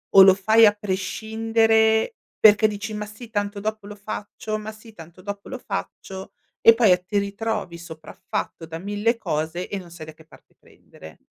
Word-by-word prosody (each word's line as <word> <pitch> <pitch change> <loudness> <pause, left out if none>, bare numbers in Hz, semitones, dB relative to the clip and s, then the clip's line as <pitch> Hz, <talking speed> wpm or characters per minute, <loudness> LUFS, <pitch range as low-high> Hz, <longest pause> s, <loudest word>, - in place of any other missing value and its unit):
o 195 - +11
lo 190 0 +9
fai 220 +4 +5
a 205 - +5
prescindere, 220 - +1 0.2
perché 215 0 +6
dici: 215 +1 -5
"Ma 210 0 -4
sì 210 +3 -11
tanto 205 -1 -3
dopo 215 -1 -4
lo 210 - -8
faccio, 215 +1 -5
ma 215 0 -7
sì 220 +1 -15
tanto 170 -1 -13
dopo 200 +1 -7
lo 265 - -6
faccio," 190 -5 -7 0.3
e 230 - +8
poi 225 -4 +4
a 180 - +6
ti 180 +3 -4
ritrovi 200 -3 -3
sopraffatto 165 0 -6
da 160 0 -7
1.000 205 +6 -1
cose 160 -2 -3
e 200 - -3
non 180 -3 -10
sai 165 -2 -10
da 155 - -9
che 160 0 -19
parte - - -20
prendere. 80 0 -16
205 Hz, 185 wpm, -23 LUFS, 185-220 Hz, 0.3 s, o